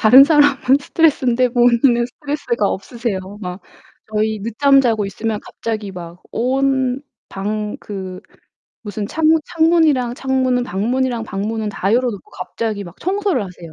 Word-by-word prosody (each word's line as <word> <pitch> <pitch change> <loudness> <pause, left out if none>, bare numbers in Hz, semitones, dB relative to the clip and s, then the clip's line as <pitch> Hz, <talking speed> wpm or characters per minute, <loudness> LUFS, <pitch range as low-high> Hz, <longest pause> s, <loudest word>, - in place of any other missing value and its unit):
다른 250 +5 +9
사람은 285 -3 +4
스트레스인데 255 -6 +2
본인은 240 0 +3
스트레스가 280 -5 -2
없으세요. 205 -2 -4
막 180 0 -6 0.5
저희 215 0 0
늦잠 275 +5 +4
자고 225 -5 +1
있으면 215 +2 -3
갑자기 215 -3 -5
막 175 -1 -10
온 260 +1 0 0.3
방 210 +2 -3
그 190 -3 -7 0.6
무슨 205 -1 -4
창문 320 +4 +2
창문이랑 320 -7 +3
창문은 260 -1 0
방문이랑 240 +3 -1
방문은 215 +1 -3
다 195 +1 -1
열어 250 +1 +3
놓고 200 -4 -10
갑자기 200 +3 -4
막 175 +1 -12
청소를 385 - 0
하세요. 175 -3 -11
235 Hz, 320 characters per minute, -19 LUFS, 205-265 Hz, 0.6 s, 다른